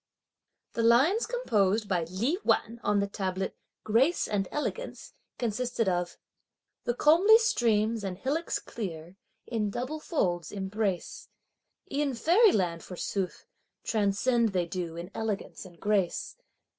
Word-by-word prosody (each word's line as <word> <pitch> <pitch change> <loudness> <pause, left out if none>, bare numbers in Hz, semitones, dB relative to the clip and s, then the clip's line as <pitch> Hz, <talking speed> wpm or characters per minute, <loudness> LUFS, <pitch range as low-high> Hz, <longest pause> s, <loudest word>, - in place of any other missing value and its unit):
The 230 - -1
lines 265 - +4
composed 215 - +1
by 175 -4 0
Li 225 - -1
Wan 230 +1 +1
on 205 -1 +2
the 200 - 0
tablet 190 -1 -3 0.3
"grace 255 +11 +2
and 195 -3 -1
elegance," 465 +11 -4 0.2
consisted 235 -1 -1
of: 175 -1 -1 0.7
The 240 - 0
comely 350 - +6
streams 230 - +1
and 190 -2 -4
hillocks 290 - -1
clear, 175 -4 -7 0.3
in 220 -3 -1
double 255 +9 -4
folds, 175 - -1
embrace; 195 -1 -3 0.6
E'en 280 -2 0
Fairyland, 230 - +3
forsooth, 185 0 -4 0.4
transcend 220 +2 +1
they 180 -2 +1
do 170 -1 -4
in 175 +3 -7
elegance 215 -3 -4
and 175 -3 -14
grace! 205 -4 0
215 Hz, 120 wpm, -29 LUFS, 190-255 Hz, 0.7 s, comely